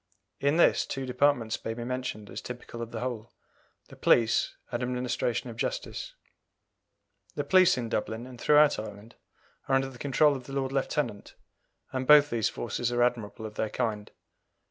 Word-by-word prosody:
In 140 +2 +2
this 170 - +4
two 135 -1 -4
departments 125 -3 +1
may 115 - -3
be 120 - -5
mentioned 125 -4 -4
as - - -6
typical 120 -1 -8
of 115 - -5
the 115 -1 -6
whole 120 -3 -4 0.6
the - - -12
police 115 -1 +3 0.2
and 120 0 -2
administration 125 -1 -2
of 115 - -11
local - - +1
justice. - - -7 1.2
The - - -1
police 185 -3 +5
in 120 -2 -2
Dublin 110 +1 -3
and 125 -2 -11
throughout 150 0 +5
Ireland 105 +1 -9 0.5
are 135 - +3
under 135 0 +1
the 125 -2 -13
control 145 +1 +3
of 130 -2 -8
the 135 - -8
Lord 135 -1 -1
Lieutenant, 135 -5 -2 0.6
and 130 0 -3
both 150 -1 +7
these 115 -2 +1
forces 120 +1 -3
are 120 0 +2
admirable 115 -2 -1
of 110 - -7
their 110 - -2
kind. 105 -2 -2
125 Hz, 175 wpm, -28 LUFS, 115-135 Hz, 1.2 s, both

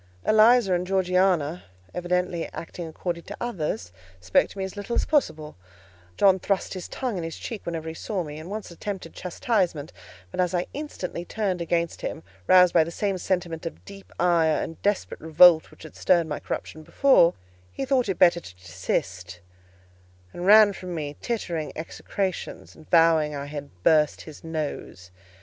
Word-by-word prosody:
Eliza 220 -2 +5
and 180 0 -1
Georgiana, 180 -3 +1 0.3
evidently 180 -1 -1
acting 170 0 -7
according 170 +1 -4
to 205 - -9
orders, 155 - -3 0.3
spoke 90 0 +2
to - - -13
me 195 - -2
as 190 +1 -6
little 205 +3 -4
as - - +1
possible: 155 - 0 0.6
John 190 -1 +5
thrust 195 +1 -1
his 185 -2 -6
tongue 245 -8 -3
in - - -4
his 165 0 -6
cheek 225 -6 -7
whenever 165 -1 -4
he 160 - -4
saw 185 +2 -3
me, 150 -1 -8
and 160 +3 -9
once 210 -2 -6
attempted 185 -1 -6
chastisement; 180 -4 -1 0.4
but - - -7
as 180 0 +1
I 175 - 0
instantly 275 - -5
turned 190 -2 -2
against 170 0 -1
him, - - -5 0.2
roused 180 -1 +6
by 165 - +6
the 160 - -6
same 195 +2 -2
sentiment 175 -3 -2
of - - -10
deep 200 -1 -12
ire 170 -3 +3
and 165 - -8
desperate 205 0 -1
revolt 160 +1 +6
which - - -16
had 155 - -12
stirred 175 -2 +3
my 150 -2 -4
corruption 155 - -6
before, 170 - +4 0.4
he 270 - -4
thought 255 -4 +1
it 190 - -1
better 175 -1 +5
to 95 - -13
desist, 90 +1 -4 0.9
and 175 +1 -4
ran 210 0 +8
from 180 -1 -7
me 150 -2 -4
uttering 175 -9 -2
execrations, 185 +3 -4
and 155 - -17
vowing 165 -3 +4
I 140 0 -5
had 145 -1 -7
burst 150 -2 +3
his 155 -2 -12
nose. 150 - -5
175 Hz, 170 wpm, -25 LUFS, 160-195 Hz, 0.9 s, ran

